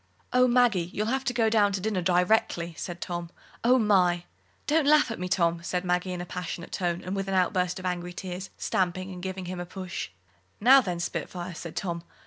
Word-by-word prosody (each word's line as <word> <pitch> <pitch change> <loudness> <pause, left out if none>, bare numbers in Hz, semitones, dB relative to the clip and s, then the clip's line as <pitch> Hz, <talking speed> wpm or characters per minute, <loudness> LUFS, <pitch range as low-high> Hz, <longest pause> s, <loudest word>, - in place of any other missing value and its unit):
"Oh, 250 0 +5
Maggie, 240 -8 +3
you'll 210 - -1
have 265 0 0
to 245 - +1
go 230 -2 +2
down 215 -2 +4
to 195 - -1
dinner 200 -1 -1
directly," 175 -1 +2
said 175 +1 -6
Tom. 175 -1 -4 0.3
"Oh, 250 +2 +5
my!" 185 -6 +3 0.4
"Don't 300 -1 +2
laugh 295 -4 +5
at 225 - -5
me, 180 0 -3
Tom," 170 -2 +2
said 180 +1 -2
Maggie, 180 +1 0
in 180 -1 -4
a - - -5
passionate 180 -1 -6
tone, 175 -1 -1
and 185 +2 -3
with 195 0 -2
an 195 - -1
outburst 180 -1 +1
of 185 - -7
angry 180 -1 -2
tears, 185 +1 -6
stamping, 185 +1 -1
and 180 - -8
giving 190 0 -4
him 180 0 -5
a 175 - -4
push. 185 -1 -5 0.5
"Now, 265 +5 +7
then, 180 -7 -3
spitfire!" 175 +1 -4
said 165 0 -8
Tom. 170 -3 -3
185 Hz, 210 wpm, -27 LUFS, 175-210 Hz, 0.5 s, Now